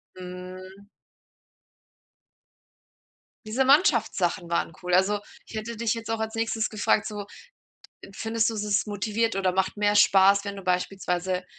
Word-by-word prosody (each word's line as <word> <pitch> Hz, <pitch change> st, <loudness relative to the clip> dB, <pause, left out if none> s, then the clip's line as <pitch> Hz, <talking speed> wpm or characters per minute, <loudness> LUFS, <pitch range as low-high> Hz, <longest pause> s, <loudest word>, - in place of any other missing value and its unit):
Mhm. 185 Hz, +2 st, -10 dB, 2.6 s
Diese 230 Hz, +5 st, +1 dB
Mannschaftssachen 230 Hz, -, +2 dB
waren 170 Hz, -1 st, -1 dB
cool. 180 Hz, -1 st, -3 dB
Also, 195 Hz, +3 st, +3 dB, 0.3 s
ich -, -, -11 dB
hätte 220 Hz, +1 st, -5 dB
dich 230 Hz, -1 st, 0 dB
jetzt 225 Hz, -1 st, -7 dB
auch 225 Hz, 0 st, -1 dB
als 220 Hz, +1 st, -3 dB
Nächstes 225 Hz, -1 st, -1 dB
gefragt 215 Hz, 0 st, +1 dB
so: 205 Hz, -1 st, -6 dB, 0.9 s
„Findest 225 Hz, +1 st, 0 dB
du, -, -, -5 dB
es 210 Hz, -1 st, -3 dB
ist 210 Hz, 0 st, +1 dB
motiviert 215 Hz, +2 st, -1 dB
oder 190 Hz, -2 st, +1 dB
macht 190 Hz, +2 st, 0 dB
mehr 205 Hz, 0 st, +2 dB
Spaß, 200 Hz, 0 st, +5 dB
wenn 200 Hz, 0 st, -5 dB
du 195 Hz, -, -8 dB
beispielsweise 180 Hz, 0 st, -1 dB
205 Hz, 140 wpm, -26 LUFS, 185-220 Hz, 2.6 s, Spaß